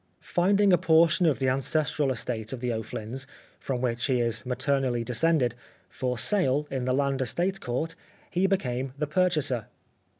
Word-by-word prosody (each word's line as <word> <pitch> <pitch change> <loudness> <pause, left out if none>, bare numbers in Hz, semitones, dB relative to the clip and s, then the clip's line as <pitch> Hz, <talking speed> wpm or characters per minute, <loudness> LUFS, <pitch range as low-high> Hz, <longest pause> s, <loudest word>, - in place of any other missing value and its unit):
Finding 195 +2 +4
a 175 - +5
portion 165 +2 +4
of 150 - +2
the 130 - 0
ancestral 140 +2 +1
estate 115 -3 -3
of 130 - -5
the 120 -1 -1
O'Flyns 110 +4 -5 0.3
(from 125 -3 -3
whom 120 -2 0
he 125 +1 +1
is 115 0 0
maternally 130 -2 0
descended) 125 0 +1 0.4
for 125 -1 -3
sale 140 - +1
in 130 -2 -2
the 130 - +1
Land 140 -1 0
Estate 175 +10 0
Court, 140 +7 -2 0.4
he 185 +2 +2
became 130 -9 -1
the 150 - -1
purchaser. 150 - +1
135 Hz, 160 wpm, -27 LUFS, 125-160 Hz, 0.4 s, a